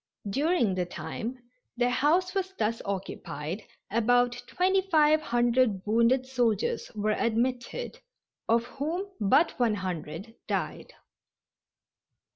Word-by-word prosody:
During 280 - +2
the 180 -1 -1
time 235 +7 -5 0.4
their 245 0 +2
house 335 +8 +2
was 385 -1 -2
thus 225 +1 0
occupied 190 -3 -4 0.3
about 245 +2 +3 0.2
twenty 375 +1 +2
five 310 -2 +5
hundred 240 -5 +2
wounded 235 +4 +3
soldiers 260 - 0
were 215 0 0
admitted, 245 - -1 0.5
of 230 +1 +4
whom 310 +10 -3
but 260 - +3
one 230 -3 +3
hundred 185 +2 -5
died. - - -3
240 Hz, 105 wpm, -28 LUFS, 215-305 Hz, 0.5 s, five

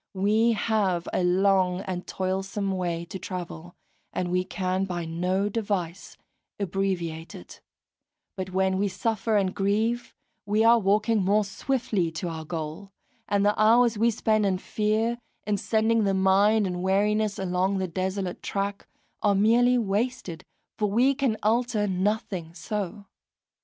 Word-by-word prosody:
We 215 +4 +3
have 205 -5 0
a - - +1
long 185 0 +2
and 185 -2 -5
toilsome 195 +2 -2
way 175 -3 -2
to 190 - -7
travel, 175 -2 -7 0.4
and 175 -1 -2
we 180 0 +1
can 185 +1 -1
by 175 -3 -4
no 180 +4 0
device 200 -5 -3 0.4
abbreviate 175 -4 -2
it; 90 - -12 0.7
but 190 0 -4
when 190 0 +1
we 205 - +2
suffer 215 +2 0
and 190 -2 +1
grieve, 220 +5 0 0.3
we 210 +2 +1
are 230 +1 +6
walking 210 +2 +2
more 205 +2 +3
swiftly 210 -4 -1
to 170 +2 -3
our 160 -1 -6
goal; 160 +4 -5 0.4
and 200 0 +2
the 205 - +4
hours 230 +2 +5
we 230 +3 +3
spend 215 -1 +1
in 195 -2 +1
fear, 220 +4 -1 0.3
in 210 -1 0
sending 220 +2 +1
the 195 -1 +1
mind 200 +3 +4
in 180 -1 -3
weariness 205 +2 +1
along 190 +1 0
the 190 -1 -1
desolate 185 +1 -3
track, 200 0 -3 0.3
are 205 -2 +3
merely 240 +5 +4
wasted, 205 -5 -2 0.4
for 210 -1 +1
we 245 +7 +3
can 265 -5 0
alter 225 -1 +1
nothing 190 -3 -2
so. 205 +2 -4
195 Hz, 145 wpm, -26 LUFS, 185-215 Hz, 0.7 s, are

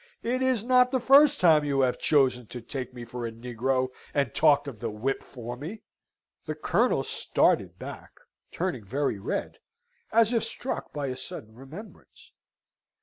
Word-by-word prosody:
It 250 +2 -1
is 260 -5 +1
not 250 0 +5
the 260 0 0
first 275 +4 +6
time 160 -4 +5
you 140 -2 +1
have 125 -1 +1
chosen 130 -5 +2
to 125 - -7
take 125 +2 -6
me 120 -1 -9
for 120 +1 -6
a - - -6
negro, 125 +3 -1 0.3
and 140 -6 +1
talked 145 -2 +4
of 125 -6 -7
the 115 +1 -3
whip 110 +6 -2
for 120 -1 -8
me." 160 - -8 0.6
The - - -3
Colonel - - +1
started - - +1
back, - - -9 0.4
turning 140 - -3
very 130 +1 -1
red, 100 - -4 0.5
and 225 - +4
as 230 +2 +2
if 230 - +2
struck 235 +3 -4
by 145 -1 -3
a 130 -1 -3
sudden 110 -3 -7
remembrance. 145 - -13
135 Hz, 170 wpm, -27 LUFS, -, 0.6 s, first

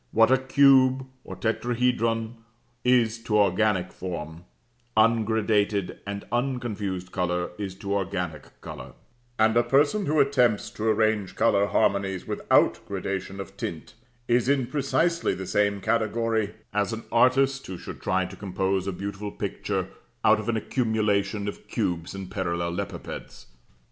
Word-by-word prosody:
What 115 +2 +5
a 130 - +5
cube, 130 -1 +5 0.2
or - - -8
tetrahedron, 115 -1 0 0.5
is 120 -2 +3
to 105 - +2
organic 100 -2 +2
form, 85 -2 -6 0.5
ungradated 110 -3 +2
and 100 0 -5
unconfused 110 -7 -2
colour 90 -1 -1
is 95 -2 -4
to 100 0 -4
organic 90 -6 -4
colour; - - -9 0.4
and 110 +1 +3
a 120 - +6
person 145 - +2
who 155 +1 +2
attempts 125 -6 +2
to 110 - -5
arrange 110 -2 +1
colour 100 0 +3
harmonies 95 -2 +1
without - - +2
gradation 95 0 -4
of 95 0 -8
tint 85 -4 -6 0.3
is 120 +2 +2
in 140 -3 +2
precisely 155 - 0
the 95 +1 -6
same 100 +2 +1
category, 110 0 0 0.2
as 105 +2 0
an 115 - -5
artist 135 +3 +3
who 95 - -6
should - - -9
try 95 +1 +1
to - - -9
compose 95 -1 -1
a - - 0
beautiful 100 +2 -5
picture - - -3 0.4
out 110 0 +5
of 110 +2 -4
an 115 - +1
accumulation 105 -3 0
of 105 - -7
cubes 85 +1 -2
and 95 -1 -7
parallelepipeds. 85 -3 -4
105 Hz, 140 wpm, -26 LUFS, 95-120 Hz, 0.5 s, a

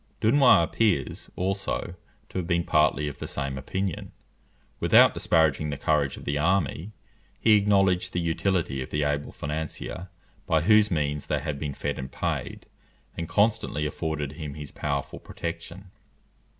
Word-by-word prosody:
Dunois 125 -5 +5
appears, 80 - 0
also, 95 -1 -2 0.4
to - - -3
have 85 - -4
been 85 -1 +1
partly 75 -2 +2
of 70 - -7
the - - -5
same 70 -1 -3
opinion. 95 +6 -4 0.7
Without - - +6
disparaging 75 -2 +2
the 70 - -3
courage 70 -3 +1
of - - -10
the 70 +1 -1
army, 90 +2 0 0.5
he 110 - +5
acknowledged 95 -3 +3
the 90 - -1
utility 85 -4 0
of 65 - -5
the 75 0 -1
able 75 0 -1
financier, 80 +4 -5 0.4
by 80 -4 +3
whose 105 +4 +5
means 75 -3 -1
they - - 0
had 70 -2 -4
been 70 -2 -4
fed - - -3
and 65 -1 -6
paid, - - -3 0.5
and 85 -1 -5
constantly 105 -8 +1
afforded 75 -1 -3
him 75 -2 -7
his 75 -2 -8
powerful 70 -2 -3
protection. 85 +3 -7
80 Hz, 150 wpm, -26 LUFS, 75-95 Hz, 0.7 s, Without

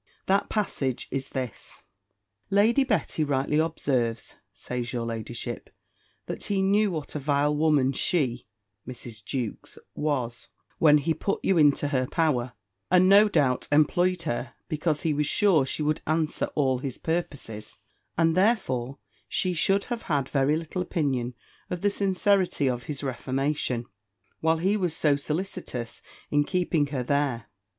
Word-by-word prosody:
That 195 +1 +2
passage 140 - -1
is 135 0 -3
this; 130 -5 -6 0.7
Lady 220 +7 +4
Betty 210 - 0
rightly 145 +1 +1
observes, 130 -8 -1 0.2
says 125 -1 -5
your 120 -2 -2
ladyship, 115 +1 -5 0.6
that - - -5
he 195 -1 0
knew 205 +2 +3
what 155 -5 -5
a 150 - -3
vile 145 +1 +1
woman 145 -3 +3
she 130 -6 0 0.4
[Mrs. 120 -3 -9
Jewkes] 125 -3 -5 0.2
was, 125 -6 -2 0.3
when 150 -2 +6
he 155 +3 0
put 195 +6 -2
you 190 - +3
into 145 -1 +4
her 130 -3 0
power; 130 -7 0 0.4
and 185 +1 +5
no 205 +2 +7
doubt, 130 -9 +1
employed 175 +4 +3
her, 120 +1 -3
because 155 0 -1
he 160 - +1
was 150 0 0
sure 175 -10 +3
she 150 - -1
would 150 +1 0
answer 155 0 0
all 130 -3 +2
his 130 -1 -4
purposes: 145 -12 -4 0.4
and 165 -1 +3
therefore 145 - +1 0.3
she 185 -1 +1
should 195 +4 +2
have 240 -2 -4
had 140 -4 +1
very 140 +2 +2
little 165 +3 -3
opinion 135 -8 -1 0.3
of 180 -1 -4
the 205 - +2
sincerity 195 -5 +1
of 125 -2 -2
his 145 -1 -4
reformation, 130 -1 -1 0.5
while 160 0 +2
he 190 +5 +1
was 180 -6 0
so 150 -2 +3
solicitous 140 - -4 0.3
in 145 0 +3
keeping 170 -3 0
her 135 -3 -3
there. 135 -4 0
150 Hz, 145 wpm, -26 LUFS, 130-175 Hz, 0.7 s, no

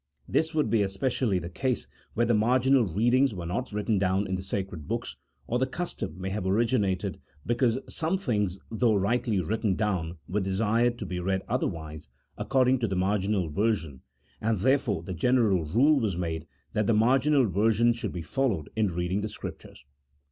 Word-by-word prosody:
This 160 0 0
would 150 -9 +1
be 115 -2 +3
especially 100 +2 0
the 85 -1 -4
case 125 +7 -1 0.3
where 120 - +2
the 120 - +2
marginal 125 +2 +3
readings 120 +7 +2
were 85 -2 -5
not 100 +10 -3
written 105 0 0
down 95 +1 +1
in 95 - -4
the 95 - -1
sacred 95 -5 -5
books: - - -3 0.3
or 125 - -1
the 130 - +1
custom 170 - -5
may 95 +1 -3
have 95 -2 -2
originated 100 -2 +1 0.3
be 120 - +1
cause 120 -1 +2
some 165 +4 -1
things 105 - -1
though 115 -1 +2
rightly 105 +1 +1
written 105 +2 0
down 90 -6 -1
were 100 +4 -1
desired 110 +5 +1
to 105 - -5
be 90 0 -4
read 95 +1 -1
otherwise 80 -2 -3 0.3
according 130 -1 +2
to 115 - 0
the 95 - -2
marginal 95 0 +1
version, 80 - -1 0.4
and 110 0 +1
therefore 110 - +1
the 95 - -5
general 105 -3 +2
rule 135 - +4
was 105 -7 -1
made 80 -2 -3 0.3
that 105 -1 0
the 115 - +3
marginal 135 +5 +4
ver 105 +2 +2
sion 120 +2 +3
should 115 - -4
be 85 - -5
followed 115 - -1
in 110 -1 +2
reading 90 +2 -1
the 110 - -3
Scriptures. 70 - -9
105 Hz, 185 wpm, -27 LUFS, 95-120 Hz, 0.4 s, rule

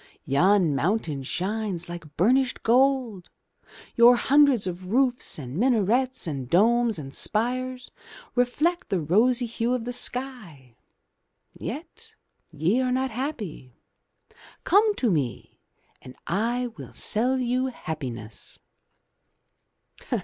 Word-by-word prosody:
Yon 175 +3 +3
mountain 155 -1 -1
shines 185 +4 -3
like 170 -4 -9
burnished 250 - +2
gold, 250 -5 +2 0.7
your 240 +1 +7
hundreds 275 -2 +4
of 180 0 -5
roofs 250 0 +1
and 130 -3 -7
minarets 250 +2 +1
and 135 -6 -5
domes 230 - +3
and 135 -3 -8
spires 250 - -1 0.4
reflect 300 +9 0
the 190 - 0
rosy 230 - +2
hue 235 +1 -1
of 240 -2 -4
the 245 - -4
sky. 215 - -4 0.8
Yet - - -8 0.3
ye 180 - +1
are 255 -1 0
not 260 0 0
happy. 215 - -5 0.9
Come 415 +2 +4
to 240 - +1
me 140 -8 -3 0.4
and 130 - -12
I 235 +6 -1
will - - -10
sell 250 +5 +1
you 255 +1 0
happiness.' 130 - -6
225 Hz, 110 wpm, -25 LUFS, 170-255 Hz, 0.9 s, your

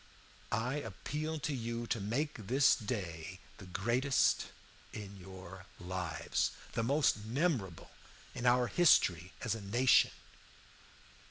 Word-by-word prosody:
"I 115 +5 0
appeal 155 +2 -4
to 145 - -1
you 120 -2 -3
to 115 - -1
make 115 +1 -2
this 135 +3 +5
day 95 -6 -5 0.2
the 95 - -10
greatest 120 +9 +2 0.5
in 100 -2 -7
your 95 0 -11
lives, 90 -2 -1 0.2
the - - -1
most 140 +4 +3
memorable 115 - -1 0.4
in 125 0 -2
our 125 0 +5
history 90 - +4
as 115 - 0
a 115 - -5
nation. 120 +6 +4
115 Hz, 115 wpm, -34 LUFS, 95-130 Hz, 0.5 s, this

